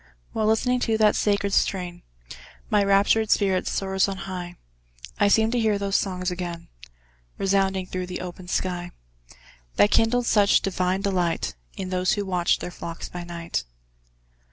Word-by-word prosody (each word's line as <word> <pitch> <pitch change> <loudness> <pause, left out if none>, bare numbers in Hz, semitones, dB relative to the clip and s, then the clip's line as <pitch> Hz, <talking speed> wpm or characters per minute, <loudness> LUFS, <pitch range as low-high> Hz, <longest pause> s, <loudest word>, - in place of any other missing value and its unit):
While 215 -1 0
listening 250 +3 +2
to 225 -2 +1
that 215 -1 +4
sacred 200 -1 +1
strain, 180 -3 0 0.7
My 210 -1 +4
raptured 200 +2 +3
spirit 190 -3 +2
soars 190 0 0
on 195 -1 -4
high; 180 -2 -6 0.6
I - - +5
seem 220 +2 +3
to 245 - +1
hear 215 -2 +2
those 200 -1 -2
songs 180 -2 0
again 175 -2 -6 0.7
Resounding 195 -1 +1
through 185 0 -4
the 180 - -5
open 180 0 -8
sky, 175 -1 -2 0.9
That 205 - +4
kindled 240 +2 +3
such 205 -3 +4
divine 185 0 0
delight, 180 -4 0 0.2
In 185 -1 -5
those 185 0 +1
who 205 -1 -2
watched 180 -2 +1
their 180 - -5
flocks 165 -1 -7
by 175 -1 -6
night. 170 - -4
190 Hz, 155 wpm, -24 LUFS, 180-205 Hz, 0.9 s, I